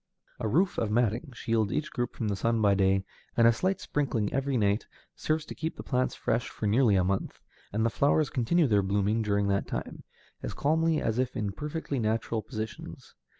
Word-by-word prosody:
A -, -, -1 dB
roof 175 Hz, -, +2 dB
of 110 Hz, -, 0 dB
matting 120 Hz, +5 st, 0 dB
shields 110 Hz, -3 st, 0 dB
each 150 Hz, -, -2 dB
group 120 Hz, 0 st, -3 dB
from 115 Hz, -, -2 dB
the 100 Hz, -, 0 dB
sun 115 Hz, +4 st, +1 dB
by 105 Hz, -2 st, +4 dB
day, 95 Hz, 0 st, +2 dB, 0.3 s
and 115 Hz, -, +6 dB
a 115 Hz, -, +7 dB
slight 185 Hz, +11 st, 0 dB
sprinkling 120 Hz, -8 st, -1 dB
every 135 Hz, 0 st, 0 dB
night 105 Hz, 0 st, +1 dB, 0.3 s
serves 155 Hz, 0 st, -1 dB
to -, -, -7 dB
keep 160 Hz, 0 st, -4 dB
the -, -, -8 dB
plants 130 Hz, -1 st, 0 dB
fresh 120 Hz, -, -1 dB
for -, -, -5 dB
nearly 110 Hz, 0 st, +4 dB
a 95 Hz, -, +3 dB
month, 95 Hz, +1 st, -2 dB, 0.3 s
and 110 Hz, +2 st, 0 dB
the 115 Hz, -, +1 dB
flowers 145 Hz, +3 st, +2 dB
continue 150 Hz, +7 st, +2 dB
their 105 Hz, -6 st, +3 dB
blooming 100 Hz, +3 st, +1 dB
during 100 Hz, -1 st, +1 dB
that 100 Hz, 0 st, 0 dB
time, -, -, -5 dB, 0.4 s
as -, -, -5 dB
calmly 160 Hz, +2 st, +2 dB
as 115 Hz, +2 st, -1 dB
if 130 Hz, -1 st, -1 dB
in 105 Hz, -2 st, -1 dB
perfectly 150 Hz, -, -4 dB
natural 110 Hz, 0 st, 0 dB
positions. 110 Hz, -1 st, -7 dB
115 Hz, 200 wpm, -29 LUFS, 105-140 Hz, 0.4 s, a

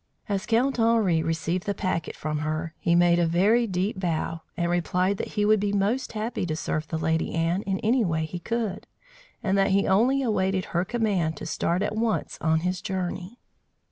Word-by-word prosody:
As 200 Hz, 0 st, -2 dB
Count 245 Hz, +3 st, +2 dB
Henri 225 Hz, -8 st, +3 dB
received 165 Hz, +3 st, -2 dB
the 200 Hz, -, 0 dB
packet 185 Hz, -5 st, -2 dB
from 150 Hz, -1 st, -3 dB
her, 155 Hz, +2 st, -3 dB
he 170 Hz, -, +2 dB
made 175 Hz, 0 st, +4 dB
a 170 Hz, -, +3 dB
very 205 Hz, +8 st, +3 dB
deep 190 Hz, +1 st, -1 dB
bow, 165 Hz, -2 st, -2 dB, 0.2 s
and 170 Hz, 0 st, 0 dB
replied 180 Hz, +3 st, +1 dB
that -, -, -5 dB
he 205 Hz, -, +3 dB
would 215 Hz, 0 st, +4 dB
be 205 Hz, 0 st, 0 dB
most 205 Hz, +6 st, 0 dB
happy 220 Hz, 0 st, -3 dB
to 155 Hz, -, -1 dB
serve 155 Hz, -1 st, -2 dB
the 160 Hz, -, -3 dB
Lady 160 Hz, +1 st, 0 dB
Anne 165 Hz, +3 st, +1 dB
in 190 Hz, -1 st, 0 dB
any 235 Hz, +3 st, +3 dB
way 160 Hz, -4 st, 0 dB
he 175 Hz, +3 st, -6 dB
could, 220 Hz, 0 st, -3 dB, 0.6 s
and 195 Hz, -1 st, +1 dB
that 195 Hz, +1 st, +3 dB
he 195 Hz, 0 st, +3 dB
only 250 Hz, +8 st, +3 dB
awaited 190 Hz, -5 st, 0 dB
her 175 Hz, +1 st, +2 dB
command 195 Hz, -8 st, 0 dB
to -, -, -7 dB
start 170 Hz, +3 st, 0 dB
at 210 Hz, -, -2 dB
once 225 Hz, 0 st, -1 dB
on 160 Hz, 0 st, +2 dB
his 180 Hz, +1 st, -2 dB
journey. 185 Hz, +3 st, -4 dB
185 Hz, 200 wpm, -26 LUFS, 165-210 Hz, 0.6 s, made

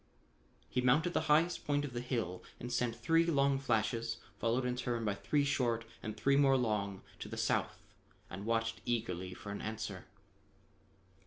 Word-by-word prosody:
He 125 Hz, -, 0 dB
mounted 150 Hz, +8 st, +3 dB
the -, -, +2 dB
highest 165 Hz, +4 st, +4 dB
point 145 Hz, 0 st, +2 dB
of 135 Hz, -, -7 dB
the 120 Hz, -, -2 dB
hill 115 Hz, -8 st, -2 dB, 0.2 s
and 125 Hz, 0 st, -5 dB
sent 120 Hz, -1 st, +1 dB
three 165 Hz, +4 st, +3 dB
long 140 Hz, -3 st, +3 dB
flashes, 115 Hz, -2 st, 0 dB, 0.2 s
followed 120 Hz, +3 st, +1 dB
in 125 Hz, 0 st, 0 dB
turn 120 Hz, -2 st, -2 dB
by 105 Hz, -, +1 dB
three 110 Hz, +9 st, +1 dB
short 120 Hz, -5 st, +1 dB, 0.2 s
and 110 Hz, 0 st, -5 dB
three 140 Hz, +5 st, +3 dB
more 135 Hz, -1 st, +5 dB
long 105 Hz, -5 st, -1 dB, 0.2 s
to -, -, -6 dB
the -, -, -6 dB
south -, -, 0 dB, 0.5 s
and 95 Hz, +3 st, -7 dB
watched 115 Hz, 0 st, 0 dB
eagerly 95 Hz, -6 st, -2 dB
for 100 Hz, -, -7 dB
an 100 Hz, -, -5 dB
answer. 105 Hz, -3 st, -4 dB
120 Hz, 170 wpm, -34 LUFS, 110-140 Hz, 0.5 s, more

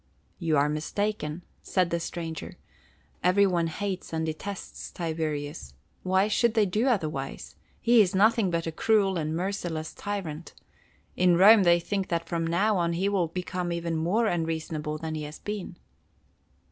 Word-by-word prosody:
"You 165 Hz, -4 st, +1 dB
are 140 Hz, +1 st, +4 dB
mistaken," 155 Hz, +2 st, -2 dB, 0.2 s
said 180 Hz, -3 st, 0 dB
the 170 Hz, -, 0 dB
stranger. 165 Hz, -1 st, -6 dB, 0.7 s
"Every 185 Hz, +3 st, +5 dB
one 175 Hz, -3 st, +1 dB
hates 190 Hz, +3 st, -4 dB
and 160 Hz, 0 st, -1 dB
detests 180 Hz, +5 st, -6 dB
Tiberius. 150 Hz, -, -4 dB, 0.3 s
Why 190 Hz, +2 st, +2 dB
should 230 Hz, +2 st, +2 dB
they 215 Hz, -2 st, +4 dB
do 210 Hz, +7 st, 0 dB
otherwise? 155 Hz, -, -2 dB, 0.3 s
He 235 Hz, -1 st, +5 dB
is 190 Hz, -1 st, +1 dB
nothing 220 Hz, 0 st, +4 dB
but 170 Hz, -1 st, -1 dB
a 165 Hz, -, -2 dB
cruel 195 Hz, +2 st, +2 dB
and 155 Hz, 0 st, -2 dB
merciless 175 Hz, -3 st, -3 dB
tyrant. 175 Hz, -6 st, -5 dB, 0.6 s
In 180 Hz, -1 st, +4 dB
Rome 205 Hz, +4 st, +8 dB
they 175 Hz, -2 st, +5 dB
think 195 Hz, +2 st, -2 dB
that 170 Hz, -1 st, -2 dB
from 165 Hz, -1 st, -1 dB
now 195 Hz, +5 st, +2 dB
on 170 Hz, -1 st, +1 dB
he 190 Hz, +4 st, 0 dB
will 190 Hz, -4 st, +1 dB
become 180 Hz, +1 st, -3 dB
even 170 Hz, -1 st, -2 dB
more 180 Hz, +9 st, +1 dB
unreasonable 160 Hz, -4 st, -2 dB
than 160 Hz, 0 st, -5 dB
he 155 Hz, -, -3 dB
has 150 Hz, +1 st, -7 dB
been." 205 Hz, -4 st, -6 dB
175 Hz, 160 wpm, -27 LUFS, 160-200 Hz, 0.7 s, Rome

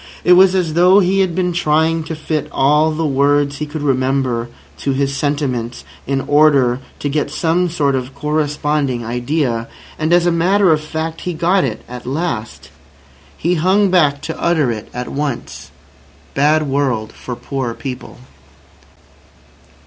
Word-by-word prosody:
It 180 Hz, -, +6 dB
was 185 Hz, +1 st, +6 dB
as 175 Hz, -4 st, 0 dB
though 180 Hz, +4 st, +5 dB
he 195 Hz, 0 st, +2 dB
had 185 Hz, -3 st, +1 dB
been 180 Hz, -1 st, 0 dB
trying 160 Hz, 0 st, +1 dB
to 160 Hz, -, -5 dB
fit 155 Hz, -1 st, -3 dB
all 150 Hz, +3 st, +3 dB
the 160 Hz, +1 st, -2 dB
words 140 Hz, 0 st, +2 dB
he 150 Hz, -, -3 dB
could 150 Hz, 0 st, -6 dB
remember 130 Hz, -3 st, 0 dB, 0.3 s
to 140 Hz, -, -1 dB
his 140 Hz, +1 st, -1 dB
sentiments 135 Hz, -5 st, -2 dB, 0.2 s
in 135 Hz, 0 st, 0 dB
order 140 Hz, -5 st, +3 dB, 0.2 s
to -, -, -3 dB
get 145 Hz, +1 st, -1 dB
some 170 Hz, +4 st, 0 dB
sort 145 Hz, -4 st, 0 dB
of 130 Hz, +1 st, -3 dB
corresponding 150 Hz, -4 st, -1 dB
idea. 120 Hz, 0 st, -1 dB, 0.3 s
And, 155 Hz, +1 st, 0 dB
as 175 Hz, 0 st, +4 dB
a 175 Hz, -, +3 dB
matter 185 Hz, +3 st, +3 dB
of 155 Hz, -1 st, +2 dB
fact, 160 Hz, +1 st, -4 dB
he 180 Hz, -2 st, -4 dB
got 180 Hz, +4 st, +2 dB
it 115 Hz, -5 st, -3 dB
at 125 Hz, 0 st, -9 dB
last. 115 Hz, -, -4 dB, 0.7 s
He 175 Hz, -, 0 dB
hung 190 Hz, +4 st, +2 dB
back 145 Hz, -6 st, +2 dB
to 160 Hz, -, -5 dB
utter 160 Hz, -7 st, +2 dB
it 110 Hz, -2 st, -6 dB
at 125 Hz, 0 st, -5 dB
once. 140 Hz, -3 st, -4 dB, 0.6 s
"Bad 150 Hz, +3 st, +3 dB
world 130 Hz, -6 st, -1 dB
for 125 Hz, -, -7 dB
poor 120 Hz, -1 st, -4 dB
people." 135 Hz, -4 st, -7 dB
150 Hz, 155 wpm, -17 LUFS, 130-165 Hz, 0.7 s, It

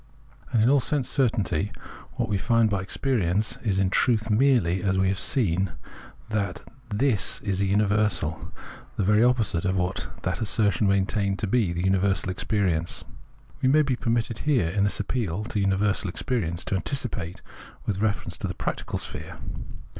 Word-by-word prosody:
And 115 Hz, -4 st, +3 dB
in -, -, +4 dB
all 140 Hz, -, +5 dB
sense 135 Hz, 0 st, -1 dB
cer 135 Hz, -3 st, +3 dB
tainty 100 Hz, -3 st, -2 dB, 0.4 s
what 120 Hz, -3 st, -1 dB
we 105 Hz, -, -1 dB
find 115 Hz, 0 st, +2 dB
by 100 Hz, -2 st, 0 dB
experience 105 Hz, -2 st, 0 dB
is 100 Hz, -5 st, -1 dB
in 95 Hz, -1 st, +2 dB
truth 115 Hz, -2 st, +2 dB
merely, 105 Hz, -7 st, +3 dB
as 95 Hz, -2 st, +1 dB
we 95 Hz, 0 st, +2 dB
have 95 Hz, 0 st, -1 dB
seen, 95 Hz, -, +2 dB, 0.6 s
that 100 Hz, -4 st, -2 dB, 0.2 s
" 125 Hz, -2 st, -28 dB
This 120 Hz, -9 st, +1 dB
" -, -, -22 dB
is 100 Hz, -2 st, -1 dB
a 100 Hz, -, +2 dB
universal, 100 Hz, -5 st, +1 dB, 0.5 s
the -, -, +1 dB
very 105 Hz, +3 st, +4 dB
opposite 115 Hz, -8 st, +2 dB
of 95 Hz, 0 st, 0 dB
what 90 Hz, 0 st, -1 dB, 0.2 s
that -, -, -2 dB
assertion 105 Hz, -2 st, +2 dB
maintained 100 Hz, 0 st, +1 dB
to 110 Hz, -, -2 dB
be 120 Hz, +5 st, +2 dB
universal 95 Hz, +2 st, +1 dB
experience. 90 Hz, -4 st, -1 dB, 0.6 s
We 130 Hz, -, +3 dB
may 155 Hz, +3 st, +5 dB
be 135 Hz, -3 st, 0 dB
permitted 115 Hz, -1 st, -1 dB
here, 130 Hz, -, +1 dB
in 100 Hz, +3 st, +1 dB
this 100 Hz, -, -1 dB
appeal 105 Hz, -3 st, -2 dB
to 105 Hz, -1 st, -3 dB
universal 100 Hz, 0 st, +1 dB
experience, 90 Hz, -4 st, -2 dB
to -, -, -1 dB
anticipate 100 Hz, -, -3 dB, 0.2 s
* -, -, -20 dB
with 100 Hz, -, -1 dB
a -, -, -5 dB
reference 105 Hz, -1 st, -1 dB
to -, -, -2 dB
the -, -, -5 dB
practi -, -, -4 dB
cal -, -, -2 dB
sphere. -, -, -6 dB
100 Hz, 180 wpm, -25 LUFS, 95-115 Hz, 0.6 s, all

